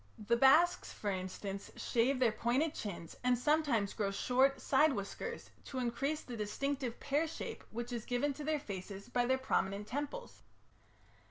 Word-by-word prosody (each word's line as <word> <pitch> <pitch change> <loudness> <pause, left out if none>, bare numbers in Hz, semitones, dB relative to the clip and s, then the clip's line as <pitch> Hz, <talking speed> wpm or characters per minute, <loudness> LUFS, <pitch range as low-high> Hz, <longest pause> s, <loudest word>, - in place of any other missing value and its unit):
The 220 +2 +1
Basques, 310 +8 +5
for 205 - -3
instance, 195 +1 -4
shave 250 +3 +1
their 250 -3 +4
pointed 260 +8 +1
chins 175 - -6
and 250 0 +3
sometimes 265 -7 +2
grow 205 -2 0
short 260 +7 +2
side 285 +2 +4
whiskers 215 - -5
to 265 - -6
increase 265 +5 -1
the 245 - -7
distinctive 250 +4 -2
pear 295 +3 +1
shape 320 - -6
which 240 +2 -5
is 235 -2 -3
given 255 +4 0
to 295 - -7
their 305 0 +1
faces 200 -3 -7
by 245 0 +1
their 260 +1 +3
prominent 200 -6 0
temples. 290 - -5
245 Hz, 160 wpm, -35 LUFS, 210-285 Hz, -, Basques